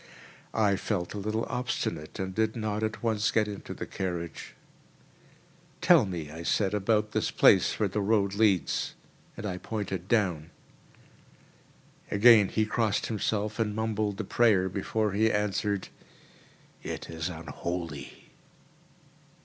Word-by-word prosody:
I 105 -3 +3
felt 90 -4 -2
a 105 - -4
little 110 +3 -1
obstinate 120 -10 -3
and 95 0 -3
did 110 +2 0
not 110 -2 -2
at 110 +1 -3
once 110 -2 +1
get 110 -1 +2
into 100 -1 -7
the - - -5
carriage. 85 -3 -5 1.2
"Tell 160 - +5
me," 85 -5 -5
I 80 +2 -8
said, 95 +3 +1
"about 105 +1 +1
this - - 0
place - - +4
where 105 - +2
the 105 +2 -2
road 100 -1 +2
leads," 100 -4 +1 0.4
and - - -6
I 90 -3 -3
pointed 95 -5 -4
down. 90 -9 +1 1.6
Again 105 -1 +6
he 110 - +1
crossed 110 -1 0
himself 110 0 -2
and 105 -2 0
mumbled 110 -2 -1
a - - -1
prayer, 100 -3 +3
before 105 +3 -1
he 110 +3 +2
answered, 105 -1 -1 0.9
"It - - -6
is 80 +1 -4
unholy." 80 -2 -6
105 Hz, 135 wpm, -28 LUFS, 95-110 Hz, 1.6 s, Again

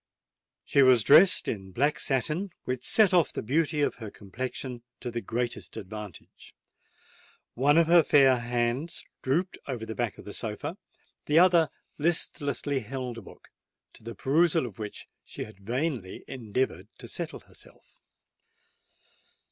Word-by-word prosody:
She 140 - +3
was 130 -4 +6
dressed 160 - +6
in 95 -3 -4
black 145 +7 +1
satin, 150 +8 0
which 125 0 -3
set 210 - +4
off 175 -4 +4
the - - -5
beauty 150 +5 +1
of - - 0
her 110 - -5
complexion 125 +5 -6 0.2
to 120 - -5
the 120 0 -3
greatest 120 0 -4
advantage. 105 -3 -10 1.0
One 145 +5 +3
of 170 - +6
her 170 +1 +6
fair 135 -4 +5
hands 120 +6 -2 0.2
drooped 170 +8 -1
over 120 -5 -4
the 110 - -5
back 120 -2 -2
of - - -12
the - - -7
sofa: - - -5 0.5
the 150 - +3
other 170 -2 +6 0.3
listlessly 145 -3 0
held 125 0 -5
a - - -11
book, - - -16 0.4
to - - -16
the 115 0 -7
perusal 160 - +2
of 115 -3 -9
which 105 -1 -6 0.2
she - - -7
had 110 -3 -13
vainly 120 - -3
endeavoured 130 -1 -3
to - - -9
settle - - -5
herself. - - -16
130 Hz, 150 wpm, -28 LUFS, 115-150 Hz, 1.0 s, was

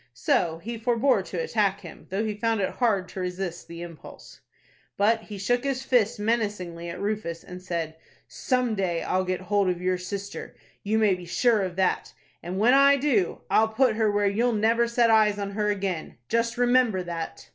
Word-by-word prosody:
So 175 - +1
he 225 +7 -6
forbore 240 0 +2
to 180 - -5
attack 200 -1 0
him, 170 -4 -12
though 200 +4 -1
he 215 - -1
found 225 +1 0
it 190 - 0
hard 205 -7 +1
to - - -7
resist 180 -1 -4
the 170 0 -8
impulse. 170 -2 -12 0.6
But 220 +3 +3
he 210 -2 -9
shook 245 +6 0
his 270 -1 -2
fist 240 -3 +2
menacingly 205 -6 -2
at - - -6
Rufus, 200 -5 -3
and 180 0 -9
said, 165 -3 -4 0.3
"Some 250 -3 0
day 185 -5 -1
I'll 185 0 0
get 185 0 -2
hold 195 +1 +1
of 180 -1 -1
your 180 0 0
sister, 200 +2 -6 0.3
you 215 +2 0
may 215 -3 +4
be 180 -1 -6
sure 225 +4 +2
of 185 -2 -3
that, 190 0 0 0.3
and 180 +2 -5
when 230 +5 +4
I 280 +1 +6
do, 250 -10 +1
I'll 220 - +5
put 225 +1 +2
her 220 -1 +2
where 205 0 +1
you'll 230 +5 +1
never 230 +2 +2
set 235 -1 +3
eyes 215 -2 +4
on 200 -1 -3
her 210 +1 -1
again. 190 - -3
Just 230 0 0
remember 245 -6 +3
that!" 170 -2 -6
205 Hz, 195 wpm, -26 LUFS, 185-230 Hz, 0.6 s, I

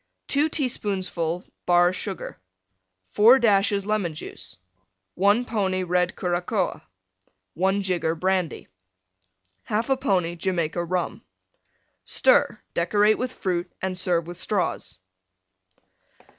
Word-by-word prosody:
2 290 +3 +2
teaspoonfuls 190 - -2 0.2
Bar 175 0 +4
Sugar. 190 0 -6 0.7
4 230 +5 +7
dashes 200 -4 +2
Lemon 200 -6 -1
Juice. - - -9 0.6
1 205 +6 +3
pony 190 -5 -1
Red 180 0 0
Curacoa. 180 +2 -1 0.7
1 190 +3 +1
jigger 175 -3 0
Brandy. 185 0 -1 1.0
1/2 240 +5 0
pony 180 -3 +1
Jamaica 170 -1 -1
Rum. 180 0 -2 0.8
Stir; - - +3
decorate 205 +5 +2
with 250 0 -2
Fruit 180 -4 -3
and 190 -1 -2
Serve 175 -2 +1
with 175 0 -8
Straws. 185 - -2
185 Hz, 100 wpm, -24 LUFS, 175-210 Hz, 1.0 s, 4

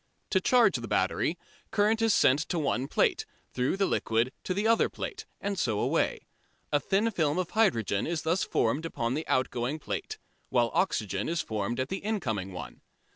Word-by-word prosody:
To 190 - +3
charge 245 +4 +4
the - - -6
battery, - - 0 0.3
current 220 +2 +2
is 225 -1 +4
sent 140 -7 +4
to 175 - -1
one 140 -4 0
plate, - - +1 0.3
through 130 +9 0
the 195 - +2
liquid 115 -5 0
to 185 - -1
the 205 +2 0
other 230 0 +4
plate, - - -6
and 200 -2 -2
so 110 -4 0
away. - - 0 0.5
A 145 - +3
thin 205 +8 +1
film 155 -6 +1
of 185 -2 -2
hydrogen 115 - +2
is 165 -2 -2
thus 165 +4 +1
formed 130 +8 0
upon 120 -6 -2
the 155 +3 -3
outgoing 130 +2 0
plate, 155 - -5 0.3
while 120 -2 +2
oxygen 100 +1 0
is 170 0 0
formed 110 +2 -3
at 130 - -1
the 190 - -3
incoming 110 - -2
one. 90 - -8
150 Hz, 180 wpm, -29 LUFS, 120-195 Hz, 0.5 s, charge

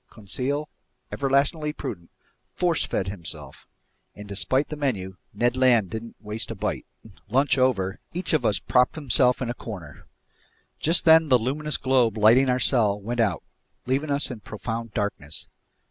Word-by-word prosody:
Conseil, 130 +8 -3 0.4
everlastingly 140 +3 +1
prudent, 85 - -7 0.5
"force 175 -3 +1
fed" 95 - -2
himself; 80 -7 -7 0.5
and 105 0 -10
despite 130 +8 0
the 150 - -4
menu, 100 -11 -3
Ned 120 +4 0
Land 125 -7 +3
didn't 115 +1 -6
waste 105 +1 -4
a - - -5
bite. - - -3 0.2
Then, 110 - -15 0.2
lunch 135 +4 +3
over, 100 -7 +1
each 180 +1 -3
of 155 - +2
us 105 - +2
propped 125 0 +2
himself 130 -4 +3
in 120 - -3
a - - -3
corner. 90 - -10 0.7
Just 165 +3 +3
then 160 -1 +6
the 130 - +6
luminous 145 +6 -1
globe 125 -4 +2
lighting 115 +5 +5
our 125 - +2
cell 105 -6 +3
went 120 +4 -4
out, 100 -8 +1 0.4
leaving 135 +4 -1
us 140 -1 +1
in 120 - -7
profound 110 +2 -6
darkness. 100 -8 -3
120 Hz, 160 wpm, -25 LUFS, 105-140 Hz, 0.7 s, then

